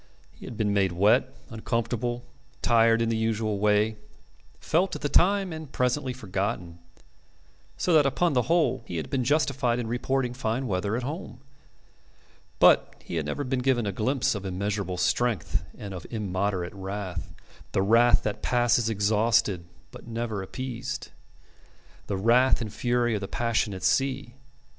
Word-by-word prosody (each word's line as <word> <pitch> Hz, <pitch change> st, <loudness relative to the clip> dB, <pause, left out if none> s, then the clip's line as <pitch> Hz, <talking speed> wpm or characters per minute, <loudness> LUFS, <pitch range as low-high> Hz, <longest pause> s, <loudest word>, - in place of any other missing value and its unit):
He -, -, -13 dB
had 115 Hz, -, -8 dB
been 105 Hz, -2 st, +1 dB
made 95 Hz, -3 st, +2 dB
wet, 105 Hz, +8 st, +3 dB, 0.2 s
uncomfortable, 120 Hz, +1 st, -2 dB, 0.4 s
tired 115 Hz, -1 st, +4 dB
in 115 Hz, -, 0 dB
the 115 Hz, -, 0 dB
usual 110 Hz, -2 st, -1 dB
way, 105 Hz, +1 st, +2 dB, 0.6 s
felt 180 Hz, +4 st, +1 dB
at -, -, -7 dB
the 145 Hz, -, 0 dB
time 195 Hz, +1 st, +3 dB
and 155 Hz, -3 st, -8 dB
presently 125 Hz, +2 st, 0 dB
forgotten. 95 Hz, -6 st, -4 dB, 1.0 s
So 180 Hz, -, +1 dB
that 150 Hz, -3 st, +6 dB
upon 165 Hz, +4 st, +1 dB
the 125 Hz, -, +3 dB
whole 170 Hz, -7 st, +2 dB
he 85 Hz, -, -4 dB
had 80 Hz, -, -5 dB
been 130 Hz, -2 st, 0 dB
justified 130 Hz, -3 st, +1 dB
in 120 Hz, -, -2 dB
reporting 125 Hz, +2 st, -1 dB
fine 125 Hz, +1 st, -2 dB
weather 100 Hz, +1 st, -1 dB
at 125 Hz, -, -4 dB
home. 145 Hz, -2 st, -6 dB, 1.2 s
But -, -, +5 dB
he 85 Hz, -, -4 dB
had 75 Hz, -2 st, -2 dB
never 145 Hz, -, -2 dB
been 130 Hz, -1 st, -1 dB
given 125 Hz, -3 st, +1 dB
a 100 Hz, -, -1 dB
glimpse 130 Hz, +6 st, 0 dB
of 100 Hz, -3 st, -5 dB
immeasurable 95 Hz, 0 st, -2 dB
strength 100 Hz, 0 st, 0 dB
and 100 Hz, -2 st, -7 dB
of 90 Hz, -4 st, -8 dB
immoderate 95 Hz, -4 st, -2 dB
wrath, 95 Hz, -2 st, -5 dB, 0.4 s
the 95 Hz, -, +1 dB
wrath 115 Hz, +4 st, +5 dB
that 105 Hz, -2 st, -3 dB
passes 120 Hz, -2 st, +2 dB
exhausted 105 Hz, -3 st, +2 dB, 0.3 s
but -, -, -12 dB
never 115 Hz, -3 st, -3 dB
appeased 130 Hz, +5 st, -5 dB, 1.0 s
the 100 Hz, -, -2 dB
wrath 120 Hz, +6 st, +4 dB
and 110 Hz, -4 st, -5 dB
fury 120 Hz, -1 st, +1 dB
of 105 Hz, -, -2 dB
the 100 Hz, -, -4 dB
passionate 110 Hz, -5 st, -1 dB
sea. 135 Hz, -2 st, +1 dB
115 Hz, 155 wpm, -27 LUFS, 100-125 Hz, 1.2 s, that